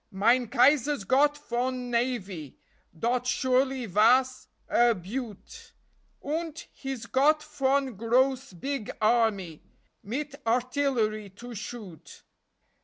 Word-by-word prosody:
Mine 230 +5 +2
Kaiser's 275 +1 +3
got 285 +7 +3
von 250 +1 -2
navy 205 - -2 0.4
Dot 245 +6 0
surely 260 0 +1
vas 245 +6 +3 0.2
a 240 -1 +4
beaut. 240 - -8 0.5
Unt 320 +1 -3
he's 270 -4 -6
got 295 +5 +3
von 275 -3 0
gross 255 +4 +1
big 245 +6 -4
army, 215 -8 +1 0.4
Mit 280 +6 -5
artillery 240 -4 0
to 235 +6 -10
shoot. 210 -6 -9
245 Hz, 100 wpm, -27 LUFS, 220-270 Hz, 0.5 s, a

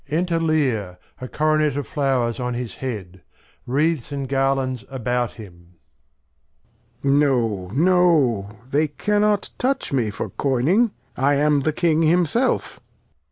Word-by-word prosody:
Enter 170 +2 0
Lear, 130 - 0 0.2
a 125 - -6
Coronet 155 0 +1
of 145 - -2
Flowers 135 -6 0
on 125 -1 -2
his 120 -4 -5
Head; 95 -8 -6 0.5
Wreaths, 150 +1 0
and 140 -1 -3
Garlands 135 -2 0
about 125 -2 -2
him. 90 -5 -14 1.3
Lear. 140 +1 +3
No, 110 -8 -1
no; 145 - +2 0.2
they 150 +2 +2
cannot 210 +6 0
touch 265 - 0
me 120 -5 +1
for 105 - -5
coyning; 145 - +2 0.3
I 140 +2 +2
am 145 0 +3
the 155 +3 0
King 160 0 +1
himself. 170 - +1
135 Hz, 125 wpm, -22 LUFS, 120-155 Hz, 1.3 s, Lear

